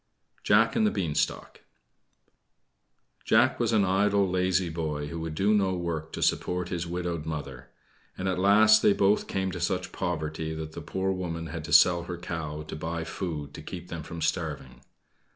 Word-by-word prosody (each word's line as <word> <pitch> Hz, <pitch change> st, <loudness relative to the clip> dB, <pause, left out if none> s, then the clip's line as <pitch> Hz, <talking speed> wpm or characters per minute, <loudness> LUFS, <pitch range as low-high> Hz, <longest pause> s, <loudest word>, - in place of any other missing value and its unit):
JACK -, -, +4 dB
AND 220 Hz, -2 st, +3 dB
THE -, -, +4 dB
BEANSTALK 80 Hz, -, -2 dB, 1.6 s
Jack -, -, +3 dB
was -, -, +1 dB
an 105 Hz, -3 st, +3 dB
idle, 100 Hz, +1 st, +2 dB
lazy 90 Hz, 0 st, +1 dB
boy 75 Hz, -3 st, -3 dB
who 85 Hz, -, -5 dB
would 80 Hz, -1 st, -5 dB
do 100 Hz, +5 st, +2 dB
no 95 Hz, -3 st, +2 dB
work 80 Hz, -2 st, -4 dB
to -, -, -2 dB
support 90 Hz, 0 st, 0 dB
his 85 Hz, -1 st, -3 dB
widowed 85 Hz, -2 st, -3 dB
mother; 70 Hz, -5 st, -6 dB, 0.5 s
and 95 Hz, -, -3 dB
at 95 Hz, -1 st, 0 dB
last 110 Hz, +3 st, +6 dB
they 100 Hz, -, +5 dB
both 100 Hz, +1 st, +2 dB
came 95 Hz, -1 st, -1 dB
to 90 Hz, -, -5 dB
such 90 Hz, +1 st, -1 dB
poverty 80 Hz, -3 st, -3 dB
that 80 Hz, 0 st, -6 dB
the -, -, -8 dB
poor 95 Hz, 0 st, -2 dB
woman 85 Hz, -3 st, -4 dB
had 80 Hz, -2 st, -5 dB
to 85 Hz, -, -7 dB
sell 85 Hz, -1 st, +6 dB
her 90 Hz, 0 st, -5 dB
cow 80 Hz, -4 st, -5 dB
to 75 Hz, -, -7 dB
buy 80 Hz, +1 st, -3 dB
food 80 Hz, -4 st, -5 dB
to -, -, -8 dB
keep 90 Hz, +2 st, -8 dB
them 85 Hz, -, -5 dB
from 80 Hz, +1 st, -6 dB
starving. 80 Hz, -2 st, -3 dB
85 Hz, 180 wpm, -27 LUFS, 80-95 Hz, 1.6 s, last